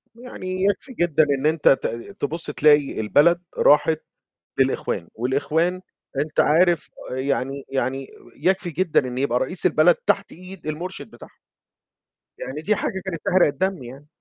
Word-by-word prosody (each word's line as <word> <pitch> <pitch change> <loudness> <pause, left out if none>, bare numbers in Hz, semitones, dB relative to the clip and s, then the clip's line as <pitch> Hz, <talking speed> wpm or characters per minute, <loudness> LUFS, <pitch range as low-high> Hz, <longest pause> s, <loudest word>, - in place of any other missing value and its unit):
يعني 185 -6 -5
يكفي 205 +6 0
جدًا 160 -5 +2 0.2
إن 145 - -4
أنت 155 -1 +2
ت 135 - +3 0.3
تبُص 160 +4 -3
تلاقي 145 -4 +3
البلد 170 +10 +3 0.2
راحت 155 +2 +4 0.6
للإخوان، 130 -9 0
والإخوان 155 +9 0 0.4
أنت 155 +1 -2
عارف 170 +2 +3 0.2
يعني 135 +1 -2
يعني 135 +1 -2 0.3
يكفي 180 +3 0
جدًا 160 -5 +1
إن 125 0 -6
يبقى 130 -2 +1
رئيس 180 +9 -3
البلد 170 0 +5
تحت 200 0 -1
إيد 180 -2 -10
المُرشد 175 +5 -5
بتاعهه. - - -15 1.0
يعني 140 +3 -6
دي 210 +7 +1
حاجة 190 -2 -3
كانت 170 -4 -4
تحرق 185 -2 +4
الدم 150 +1 -2
يعني. 135 +5 -11
155 Hz, 140 wpm, -22 LUFS, 140-185 Hz, 1.0 s, البلد